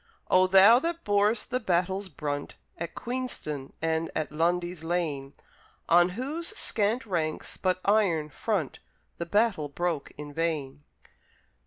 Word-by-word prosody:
O 185 0 +6
thou 195 +5 +8
that 335 +3 -3
bor'st 205 +3 +2
the 250 - +1
battle's 190 -1 0
brunt 145 -2 -4 0.2
At 170 -1 -6
Queenston 235 - -4
and 160 0 0
at 155 -1 -2
Lundy's 175 +2 0
Lane, 155 -5 -2 0.6
On 175 +1 +6
whose 305 +7 -3
scant 220 +4 0
ranks, 165 -6 -2
but 185 -1 0
iron 185 -8 +2
front 195 -11 -2 0.4
The 170 - -3
battle 205 -6 +2
broke 170 0 -2
in 145 0 -8
vain! 145 -3 -2
175 Hz, 130 wpm, -28 LUFS, 155-210 Hz, 0.6 s, thou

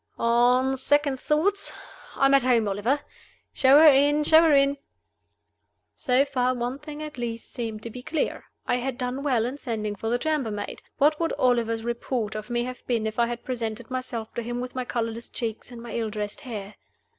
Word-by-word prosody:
"On 245 +3 +3
second 280 0 +2
thoughts, 350 +9 +2 0.4
I 275 - +2
am 275 - +4
at 275 - +6
home, 240 -3 +2
Oliver. 215 +9 0 0.5
Show 265 +1 +6
her 315 - +8
in! 290 +1 +5
show 315 +2 +7
her 325 -2 +4
in!" 280 0 +4 1.2
So 255 +2 +2
far, 255 -2 0
one 245 +3 -3
thing 300 0 -8
at 300 -4 -8
least 230 -1 -5
seemed 225 -3 -5
to 230 - -6
be 250 - -8
clear. 315 +4 -2 0.2
I - - +1
had 250 0 -3
done 255 +1 -3
well 255 -6 +1
in 265 +4 -5
sending 215 -5 -3
for 225 +2 -4
the 240 - +2
chambermaid. 245 -8 -2 0.2
What 300 +2 +3
would 330 -1 0
Oliver's 235 -4 +1
report 235 -2 -2
of 215 +2 -6
me 240 0 0
have 250 0 -7
been 230 -3 0
if 220 +1 -3
I 235 - +4
had 240 0 -6
presented 235 -1 -4
myself 245 -3 -4
to 235 - -3
him 240 +1 -4
with 250 0 -5
my 255 -1 -3
colorless 230 -1 -3
cheeks 225 -2 -5
and 240 -2 -10
my 240 - -8
ill 225 -2 -1
dressed 210 -1 -5
hair? 215 -7 -7
245 Hz, 200 wpm, -25 LUFS, 230-275 Hz, 1.2 s, her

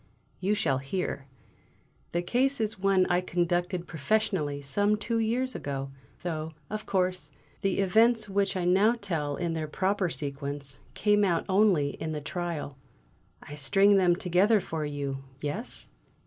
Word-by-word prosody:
You 200 +3 +1
shall 135 -10 +1
hear! 135 -1 -3 0.8
The 175 +1 -1
case 260 +8 +1
is 220 -2 -2
one 195 -1 +3
I 175 0 +2
conducted 175 0 -1
professionally 160 -3 0
some 205 +10 +1
two 225 +2 -1
years 245 +3 0
ago, 135 -1 -4 0.3
though, 160 -2 -3 0.2
of 215 0 -4
course, 185 -5 0 0.3
the 195 -1 0
events 220 +3 +3
which 195 -1 0
I 180 - -1
now 195 +6 +4
tell 155 -8 -2
in 170 +1 -2
their 160 -1 -2
proper 190 +3 0
sequence, 140 -2 -5 0.2
came 210 -1 +3
out 175 -4 +1
only 190 -7 +3
in 155 +2 -5
the 150 - -2
trial. 155 -3 -4 0.6
I 145 - -10
string 195 +8 +4
them 180 -2 +4
together 185 +5 +3
for 160 -4 -4
you, 140 -2 -4 0.2
yes?" 150 - -5
180 Hz, 150 wpm, -28 LUFS, 150-205 Hz, 0.8 s, now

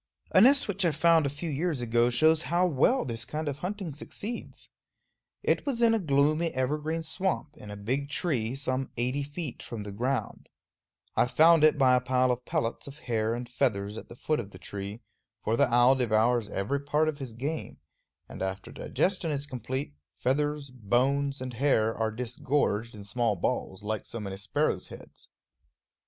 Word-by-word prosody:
A 185 - +6
nest 275 +5 +6
which 200 -1 -1
I 170 - +4
found 160 0 +4
a - - -1
few 150 +4 -5
years 155 0 -1
ago 120 0 +2
shows 155 +6 +4
how 175 +2 +3
well 175 - +2
this 115 -2 -1
kind 155 +5 -4
of 145 0 -3
hunting 185 -2 -4
succeeds. 210 - -7 0.8
It - - +2
was 245 -5 -1
in 230 -1 +5
a 225 - +2
gloomy 155 0 +2
evergreen 150 +5 -1
swamp, 160 -2 -2
in 105 -9 -11
a 105 - -7
big 130 +8 -2
tree, 130 -7 -1
some 135 -1 -2
eighty 125 +4 0
feet 145 -1 -5
from 110 -3 -6
the 105 - -7
ground. 125 +6 -3 0.7
I - - +3
found 160 +4 +5
it 155 0 +6
by 130 -2 +5
a 125 - +5
pile 130 0 +2
of 125 0 -3
pellets 115 +4 -2
of 140 +1 -10
hair 115 -4 -1
and 120 0 -5
feathers 105 -5 -1
at - - -9
the 120 - -10
foot 155 +5 -1
of 100 - -5
the 95 - -12
tree; 100 +4 -7 0.4
for 110 - +1
the 140 -1 +3
owl 120 +2 +6
devours 120 -2 +2
every 105 +9 -1
part 150 +2 +1
of 155 -2 -2
his 130 -4 -5
game, 145 +7 -4 0.5
and - - -9
after 95 0 -4
digestion 185 -3 -1
is 145 -1 -2
complete, 130 - -4 0.2
feathers, 145 +1 0
bones, 130 +4 0
and 130 -1 -5
hair 115 -3 +2
are 110 -1 0
disgorged 120 -1 -1
in 105 - -9
small 110 +1 0
balls, 95 +2 -2
like 110 0 -3
so 115 - -6
many 100 -2 -5
sparrow 145 +10 0
heads. - - -12
130 Hz, 185 wpm, -28 LUFS, 115-155 Hz, 0.8 s, A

